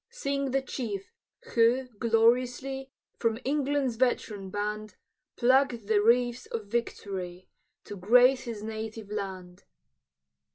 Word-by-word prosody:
Sing 280 - -2
the 270 +1 0
chief, 215 -7 -5 0.4
who, 240 +3 +3
gloriously, 245 +4 +2 0.3
From 225 -2 +1
England's 280 -3 0
veteran 215 -6 0
band, 210 +2 -4 0.4
Pluck'd 255 -2 +3
the 210 -1 +3
wreaths 240 +2 +2
of 225 -2 -4
victory, 195 -5 -4 0.3
To 205 - -8
grace 250 +7 +5
his 225 -3 -6
native 220 -1 -6
land! 185 -3 -6
230 Hz, 110 wpm, -28 LUFS, 210-255 Hz, 0.4 s, grace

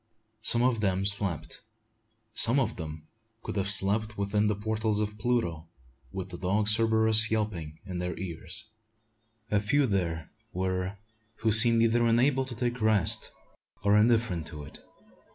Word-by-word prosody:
Some 120 +1 +3
of 125 -3 +1
them 95 -1 0
slept. 95 -6 0 0.7
Some 120 +4 +4
of 115 -4 -2
them 80 -2 -8 0.4
could - - -6
have 100 -1 -1
slept 105 +2 0
within 105 +1 0
the 105 - 0
portals 110 +1 -2
of 105 0 -4
Pluto, 85 -9 -2 0.4
with 95 -1 -6
the - - -9
dog 100 +3 0
Cerberus 110 0 +4
yelping 95 -9 -3
in 90 -2 -6
their 90 -1 -4
ears! 95 +4 -6 0.9
A 105 - +2
few 135 +8 +1
there 85 - -3 0.2
were 95 +1 -3 0.4
who 110 - +1
seemed 115 +1 +8
either 115 +1 +2
unable 130 +3 +2
to 125 -2 -7
take 120 +1 -3
rest 110 -5 +1 0.5
or 100 0 +3
indifferent 110 -7 +1
to 75 -2 -8
it. 70 - -10
105 Hz, 150 wpm, -28 LUFS, 95-115 Hz, 0.9 s, seemed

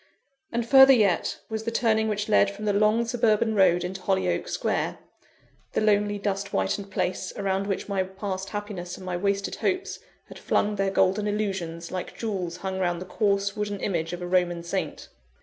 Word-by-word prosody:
And 235 0 -1
further 265 +1 +9
yet, 205 -8 +2
was 220 -1 -3
the 230 - -1
turning 220 -1 +2
which 210 -1 -1
led 205 -2 +4
from 205 +2 -7
the 205 - +2
long, 215 +3 +3
suburban 230 -2 +2
road 180 -4 +4
into 185 +1 -5
Hollyoake 190 0 0
Square - - -1 0.8
the - - +1
lonely, 205 -1 +2
dust 200 -1 -2
whitened 200 0 -1
place, 185 -1 -2
around 195 0 -1
which 195 - -2
my 200 -2 0
past 190 0 -4
happiness 205 -4 -5
and 185 - -10
my 180 -1 -2
wasted 200 +2 -1
hopes 375 -1 -1 0.3
had - - -11
flung 210 0 +1
their 195 -1 +1
golden 195 +2 +2
illusions, 190 -5 -3
like 185 -1 -5
jewels 185 -6 -3
hung 190 +1 -4
round 175 -2 0
the 185 - -6
coarse 200 0 0
wooden 205 -1 -3
image 165 -5 -1
of 175 0 -5
a - - -4
Roman 175 -1 +1
saint. 170 - -4
200 Hz, 185 wpm, -26 LUFS, 185-210 Hz, 0.8 s, further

